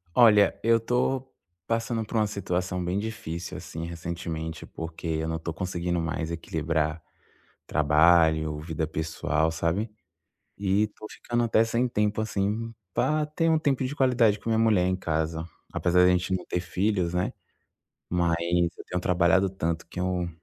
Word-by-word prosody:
Olha, 105 -4 +6
eu 115 +1 +4
tô 130 +3 0 0.4
passando 115 0 -1
por 115 - -7
uma 110 - +3
situação 90 -2 -2
bem 90 +2 -1
difícil, 105 -6 -5
assim, 80 +1 -6
recentemente, 85 -1 -5
porque 80 +1 -7
eu 80 0 -1
não 80 0 -1
tô 80 0 -4
conseguindo 90 0 -2
mais 85 0 -2
equilibrar 80 -1 -1 0.7
trabalho, 80 0 +4
vida 80 0 -3
pessoal, 80 0 -1
sabe, 85 +7 -1 0.7
e 100 +1 +2
tô 110 +1 -11
ficando 120 0 -2
até 115 -1 +4
sem 115 +2 0
tempo, 105 -2 0
assim, 110 +2 -1 0.2
pra 155 +7 +1
ter 165 +2 0
um 160 - +4
tempo 140 -4 +1
de 135 +3 -3
qualidade 120 -6 +3
com 115 - -4
minha 110 - +2
mulher 110 -5 +4
em 95 - +1
casa, 80 -2 -2 0.3
apesar 90 0 +2
da - - +6
gente 90 +1 +1
não 90 - -8
ter 90 - -2
filhos, 90 -1 0
né, 90 +1 0 0.8
mas 85 -2 +2 0.4
eu - - -10
tenho 90 - -3
trabalhado 90 +2 +3
tanto 85 -3 -3
que 90 - -6
eu 90 -1 -1
90 Hz, 160 wpm, -27 LUFS, 80-110 Hz, 0.8 s, Olha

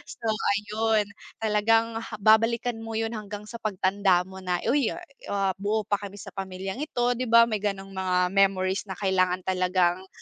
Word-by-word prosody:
So 225 - -3
ayun. 210 0 0 0.3
Talagang 225 +1 +2
ha 230 - -7
babalikan 225 +2 +3
mo 225 0 -6
'yun 225 +1 -1
hanggang 210 -2 -6
sa 230 +2 -9
pagtanda 190 -3 +1
mo 190 +1 -11
na. 180 -1 -2
Uy, 265 +1 +2 0.4
ah, 195 -1 0
buo 210 +2 0
pa 205 0 -1
kami 200 -1 -8
sa 205 - -10
pamilyang 190 +2 -5
ito. 245 -5 0
'Di 255 - -1
ba 230 +1 +7
may 220 -2 -1
ganong 195 -1 -3
mga 180 -1 0
memories 195 0 +2
na 190 - -5
kailangan 185 -2 +1
talagang 185 0 +1
205 Hz, 170 wpm, -26 LUFS, 190-225 Hz, 0.4 s, ba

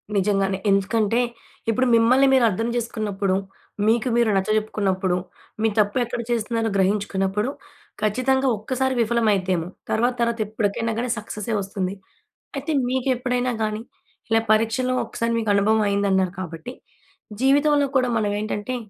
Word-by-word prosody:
నిజంగానే 195 -1 +1
ఎందుకంటే 210 +3 +2 0.5
ఇప్పుడు 255 +4 +2
మిమ్మల్ని 255 +4 +5
మీరు 260 -2 +5
అర్థం 225 +4 -2
జేసుకున్నప్పుడు, 210 -5 -1 0.5
మీకు 230 +2 +2
మీరు 235 -2 +3
నచ్చ 190 +2 0
జెప్పుకున్నప్పుడు, 190 -4 0 0.4
మీ 225 - +3
తప్పు 205 +4 +2
ఎక్కడ 240 0 -4
చేస్తున్నారో 225 -1 0
గ్రహించుకున్నప్పుడు 195 +3 0 0.5
ఖచ్చితంగా 260 +5 +1
ఒక్కసారి 260 +4 -1
విఫలమైద్దేమో! 200 -7 +1 0.2
తర్వాత 240 +3 +2
తర్వాత 235 -1 0
ఎప్పటికైనా 220 +1 -1
గాని 245 0 -2
సక్సెసే 215 +1 -5
వస్తుంది. 195 0 -3 0.6
అయితే 285 +4 -3 0.2
మీకెప్పుడైనా 250 -1 0
గానీ 215 0 -2 0.5
ఇలా 225 0 +3
పరీక్షలో 225 +4 +2
ఒకసారి 230 0 -2
మీకు 220 -2 -2
అనుభవం 215 +2 +3
అయిందన్నారు 190 -2 +1
కాబట్టి, 175 +7 -6 0.7
జీవితంలో 285 +2 +4
కూడా 255 -1 +2
మనవేంటంటే, 210 +3 -2
220 Hz, 120 wpm, -23 LUFS, 200-245 Hz, 0.7 s, మిమ్మల్ని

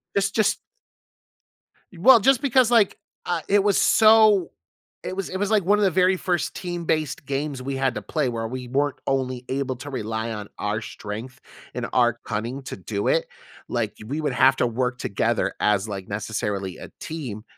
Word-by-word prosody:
It's 195 0 +2
just 215 0 +1 1.4
Well, 235 +6 +7
just 270 +3 +4
because, 260 -3 +3
like, 225 -5 +4 0.3
I 175 - -1
it 200 0 +4
was 205 - +3
so 215 -4 +5 0.5
it 185 - -5
was 195 - -3
it 190 - -3
was, 205 +1 -1
like, 210 -5 +3
one 205 +2 +3
of 210 - +2
the 190 - +4
very 185 +2 +3
first 175 -2 -1
team-based 170 -4 -2
games 140 -1 -3
we 135 +1 -3
had 135 -2 0
to 105 - -5
play 140 +5 -1
where 115 -1 -3
we 125 +1 -6
weren't 140 +2 0
only 130 -2 -1
able 130 -1 -2
to 145 +4 -8
rely 110 -2 -3
on 105 -1 -6
our 105 +1 -1
strength 110 +6 -7 0.3
and - - -3
our 120 -2 +3
cunning 120 +5 -3
to - - -6
do 100 +2 -3
it, - - +2 0.4
like, - - -2
we 145 +6 -3
would 145 -4 -1
have 135 0 +5
to 125 - +2
work 125 +1 -2
together 100 - -1
as, 105 0 +1
like, 95 -2 -5
necessarily 100 -2 -3
a - - -10
team 125 -10 -6
135 Hz, 185 wpm, -24 LUFS, 115-185 Hz, 1.4 s, Well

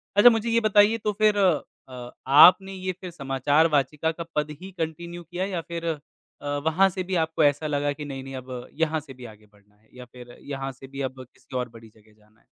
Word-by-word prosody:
अच्छा, 205 +4 +9
मुझे 225 0 0
ये 230 0 +3
बताइए 215 +1 +4
तो 210 -1 -1
फिर 210 -1 +4
अ, 130 -9 -2 0.2
आपने 175 +7 +7
ये 185 0 -3
फिर 180 -2 -7
समाचार 145 +1 +1
वाचिका 150 +3 0
का 170 +1 -6
पद 150 0 -1
ही 190 +1 -9
कंटिन्यू 170 +2 -5
किया 175 +3 -4
या 185 -4 -3
फिर 170 0 -6
अ, 160 -3 -2 0.7
वहाँ 185 +5 +4
से 185 0 -4
भी 185 0 -3
आपको 160 -1 +1
ऐसा 145 +2 +2
लगा 145 -1 0
कि, 150 0 -8
नहीं-नहीं 135 -1 -7
अब 130 -1 -7
यहाँ 160 -1 0
से 145 -3 -12
भी 125 -1 -12
आगे 110 -2 -13
बढ़ना 105 0 -27
है 110 +1 -32
या 125 - -9
फिर 125 0 -14
यहाँ 135 -1 -5
से 135 +1 -13
भी 135 +1 -7
अब 130 -1 -5
किसी 130 - -14
और 125 -1 -2
बड़ी 115 -1 -14
जगह 110 0 -24
जाना 105 +1 -28
है? - - -32
150 Hz, 225 wpm, -25 LUFS, 130-175 Hz, 0.7 s, अच्छा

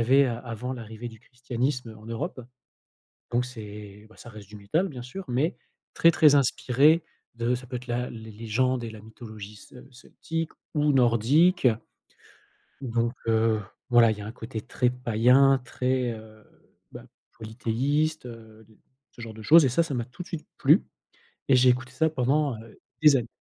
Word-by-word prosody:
avait 135 +4 +5
avant 120 0 -4
l'arrivée 115 -1 -8
du 110 -1 -14
christianisme 125 -1 -4
en 110 - -14
Europe, 125 +5 -5 0.9
donc 120 +1 +1
c'est, 105 -3 -10
bah - - -20
ça 120 - -12
reste 105 -3 -12
du 105 - -11
métal 155 - -1
bien 125 -4 -8
sûr, 185 +11 -8
mais 140 +8 0 0.4
très, 165 - +5
très 150 -3 +5
inspiré 140 +4 +3 0.3
de 120 +1 0
ça 125 +1 -8
peut 125 0 -5
être 125 +1 -11
la 120 +1 -2
les 110 -1 -10
légendes 120 +3 -1
et 115 - -5
la 110 -1 -10
mythologie 110 -1 -11
ce 125 +5 -15
celtique 165 +6 -6 0.2
ou 150 -1 +2
nordique, 135 - +3 1.2
donc 120 -1 -1
heu, 110 -1 +2 0.3
voilà, 120 -1 +6
il 110 - -1
y - - -8
a 100 - -7
un 110 - -6
côté 110 -2 -7
très 125 +3 0
païen, 125 +3 +3
très, 125 -1 -1
heu, 110 -1 -13 0.5
bah - - -11 0.3
polythéiste, 130 +7 -1
heu, 110 -2 -13 0.5
ce - - -20
genre 115 -1 -8
de 110 - -11
choses 155 +7 +7
et - - +2
ça, 150 +8 +2
ça 160 - -5
m'a 120 - -2
tout 125 +7 -11
de - - -16
suite 160 -2 -7
plu - - +4 0.7
et 135 - +6
j'ai 125 0 +5
écouté 130 +1 0
ça 160 +5 +1
pendant, 140 0 0
heu, 115 -1 -16 0.2
des 150 -2 +7
années. 120 -3 0
120 Hz, 175 wpm, -26 LUFS, 110-135 Hz, 1.2 s, choses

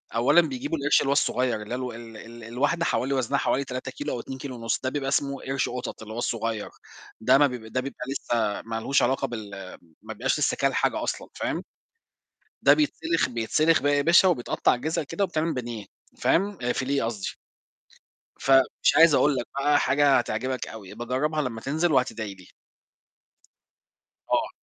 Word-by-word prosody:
أولًا 125 +9 +5
بيجيبوا 250 - -3
القرش 145 0 +3
اللي - - -2
هو - - +4
الصغيّر 125 -5 +1
اللي 105 - -9
هي - - 0
الو 125 -1 -4
ال 115 -1 -10
ال 115 +2 -11
الواحدة 140 +9 0
حوالي 135 -3 0
وزنها 135 +1 0
حوالي 140 - +1
3 130 0 -5
كيلو - - -4
أو - - -3
2 130 +3 -7
كيلو 130 -1 -7
ونُص، 115 -1 -2
ده 130 - 0
بيبقى 135 0 -2
إسمه 140 0 0
قرش 135 0 -1
قطط 125 -2 -6
اللي 110 0 -8
هو - - -7
الصغيّر، 115 -2 -2 0.5
ده 110 - +5
ما 145 0 +5
بيب 125 -4 -7
ده 120 +4 -2
بيبقى 135 -1 -6
لسّه 115 -6 -1
ما 115 0 -6
لهوش 135 +5 +2
علاقة 135 +1 +1
بال 110 -5 -6 0.5
ما 110 +1 -7
بيبقاش 130 +7 -1
لسّه 150 - +1
كَل 135 -1 +1
حاجة - - 0
أصلًا - - -3
فاهم، - - -3 1.0
ده - - +7
بيتسلخ 315 - 0
بيتسلخ 130 +7 +2
بقى 145 0 +3
يا 145 - +2
باشا 170 +4 +6
وبيتقطع 125 -6 +1
جِزَء 155 +7 -2
كده 200 +7 -2
وبيتعمل 165 -3 -1
بانيه، 120 -4 -5 0.3
فاهم، 200 +2 +1
فيليه 135 0 -1
قصدي، 110 -4 -3 1.1
فمش 135 +1 +3
عايز 160 +1 +7
أقول 145 0 +4
لك 120 -2 -2
بقى 145 +1 +3
حاجة 145 -1 +4
هتعجبك 125 +2 -2
أوي، 105 -4 -10
ابقي 120 +3 -7
جرّبها 150 +5 0
لمّا 120 -5 -4
تنزل 155 +6 0
وهتدعي 120 -6 0
لي. 95 -2 -16 1.8
آه. - - +2
130 Hz, 185 wpm, -26 LUFS, 115-145 Hz, 1.8 s, ده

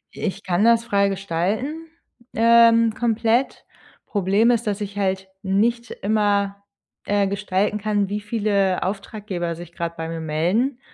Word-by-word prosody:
I - - -9
ich 195 +1 -3
kann 180 +2 +1
das 230 0 +4
frei 200 -3 +2
gestalten, 200 - -2 0.5
ähm, 230 0 +5
komplett. 230 +2 0 0.4
Problem 205 +4 +2
ist, 235 -2 0
dass 205 0 -1
ich 200 0 -5
halt 190 -1 -1
nicht 225 +4 0
immer, 200 -1 0 0.4
äh, 205 -1 +1
gestalten 200 +1 -1
kann, 205 -1 0
wie 205 +1 -3
viele 205 -3 0
Auftraggeber 195 -3 -4
sich 170 0 -11
gerade 170 0 -4
bei 160 0 -4
mir 165 0 -5
melden 180 - 0
205 Hz, 145 wpm, -22 LUFS, 190-225 Hz, 0.5 s, ähm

